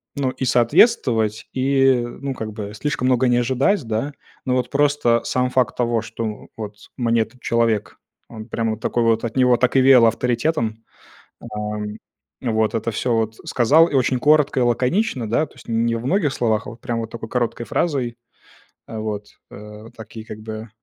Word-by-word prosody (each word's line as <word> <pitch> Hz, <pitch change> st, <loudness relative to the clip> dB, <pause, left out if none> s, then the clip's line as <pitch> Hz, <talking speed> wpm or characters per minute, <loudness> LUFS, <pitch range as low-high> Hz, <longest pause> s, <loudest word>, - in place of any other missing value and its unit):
ну, 140 Hz, -2 st, 0 dB
и 130 Hz, -, -6 dB
соответствовать, 120 Hz, -, +3 dB
и 135 Hz, -1 st, +3 dB
ну, 135 Hz, +3 st, -5 dB
как 110 Hz, -4 st, -6 dB
бы, 105 Hz, -1 st, -7 dB
слишком 130 Hz, +3 st, -2 dB
много 130 Hz, 0 st, +3 dB
не 120 Hz, -, +3 dB
ожидать, 135 Hz, -, +1 dB
да. 115 Hz, +6 st, -2 dB, 0.3 s
Но, 125 Hz, -1 st, 0 dB
вот, 125 Hz, -1 st, -1 dB
просто 145 Hz, -5 st, +2 dB
сам 125 Hz, 0 st, 0 dB
факт 125 Hz, -4 st, 0 dB
того, 120 Hz, -2 st, +1 dB
что, 115 Hz, +1 st, -5 dB
у 105 Hz, -1 st, -6 dB
вот, 105 Hz, -2 st, -6 dB, 0.2 s
мне 115 Hz, -2 st, +2 dB
этот 110 Hz, +3 st, -6 dB
человек, 115 Hz, -3 st, 0 dB, 0.3 s
он, 110 Hz, -1 st, -10 dB
прям, 115 Hz, 0 st, -1 dB
вот 110 Hz, 0 st, -6 dB
такой 120 Hz, -, 0 dB
вот, 115 Hz, -1 st, +2 dB
от 115 Hz, +1 st, -4 dB
него 125 Hz, -1 st, +5 dB
так 125 Hz, +2 st, +1 dB
и -, -, +6 dB
веяло 130 Hz, -3 st, +7 dB
авторитетом, 115 Hz, -2 st, -1 dB, 0.6 s
а, -, -, -9 dB, 0.9 s
вот 110 Hz, -2 st, 0 dB
это 115 Hz, +1 st, -1 dB
всё, 120 Hz, +3 st, -1 dB
вот, 110 Hz, -1 st, 0 dB
сказал 145 Hz, +7 st, +4 dB
и -, -, -6 dB
очень 130 Hz, -1 st, +2 dB
коротко 150 Hz, 0 st, +3 dB
и -, -, +3 dB
лаконично, 125 Hz, -, 0 dB
да, 120 Hz, +8 st, +2 dB
то -, -, -15 dB
есть, -, -, -16 dB
не 115 Hz, 0 st, +1 dB
во 115 Hz, +2 st, -4 dB
многих 165 Hz, -3 st, +1 dB
словах, 115 Hz, -4 st, 0 dB
а -, -, -6 dB
вот 115 Hz, +2 st, -12 dB
прямо 120 Hz, -2 st, -3 dB
вот 110 Hz, -, -7 dB
такой 115 Hz, -1 st, -7 dB
короткой 120 Hz, -1 st, -2 dB
фразой. 130 Hz, -3 st, -1 dB, 0.7 s
А, 110 Hz, -, -6 dB
вот, 105 Hz, -1 st, -4 dB, 0.2 s
э, 105 Hz, +1 st, -11 dB
такие, 110 Hz, 0 st, -10 dB
как 110 Hz, -, -9 dB
бы, 110 Hz, +1 st, -7 dB
120 Hz, 190 wpm, -21 LUFS, 110-130 Hz, 0.9 s, веяло